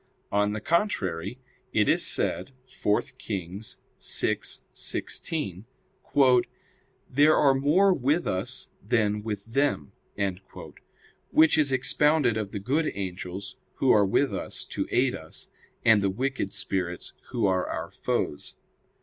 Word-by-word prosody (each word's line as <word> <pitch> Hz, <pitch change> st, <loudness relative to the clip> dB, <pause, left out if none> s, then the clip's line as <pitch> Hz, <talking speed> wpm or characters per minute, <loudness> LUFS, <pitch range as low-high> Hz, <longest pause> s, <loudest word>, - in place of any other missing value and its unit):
On 105 Hz, 0 st, +2 dB
the 110 Hz, -, -4 dB
contrary, 100 Hz, -, 0 dB, 0.4 s
It -, -, +3 dB
is -, -, +3 dB
said 135 Hz, -, +1 dB
(4 105 Hz, -5 st, 0 dB, 0.2 s
Kings 95 Hz, +1 st, -5 dB, 0.2 s
6:16): 110 Hz, -, -3 dB, 1.4 s
"There 145 Hz, +4 st, +5 dB
are 140 Hz, -2 st, +5 dB
more 155 Hz, +9 st, +4 dB
with 150 Hz, +3 st, +1 dB
us 95 Hz, 0 st, -3 dB
than 105 Hz, -1 st, +1 dB
with 105 Hz, -2 st, -4 dB
them": 115 Hz, -, 0 dB, 1.4 s
which 160 Hz, 0 st, +5 dB
is 145 Hz, -3 st, +3 dB
expounded 140 Hz, -1 st, +3 dB
of 110 Hz, -3 st, -2 dB
the 105 Hz, -, -4 dB
good 145 Hz, +10 st, 0 dB
angels 95 Hz, 0 st, -5 dB, 0.2 s
who 130 Hz, -, +3 dB
are 105 Hz, -, +6 dB
with 115 Hz, +8 st, +2 dB
us -, -, -4 dB
to -, -, -3 dB
aid 125 Hz, 0 st, +2 dB
us, 80 Hz, 0 st, -9 dB, 0.4 s
and 110 Hz, -2 st, +6 dB
the 100 Hz, -, +2 dB
wicked 130 Hz, 0 st, -2 dB
spirits 95 Hz, -3 st, -3 dB, 0.2 s
who 120 Hz, -4 st, 0 dB
are 95 Hz, -1 st, +1 dB
our -, -, -4 dB
foes. 75 Hz, -, -3 dB
110 Hz, 125 wpm, -27 LUFS, 95-140 Hz, 1.4 s, are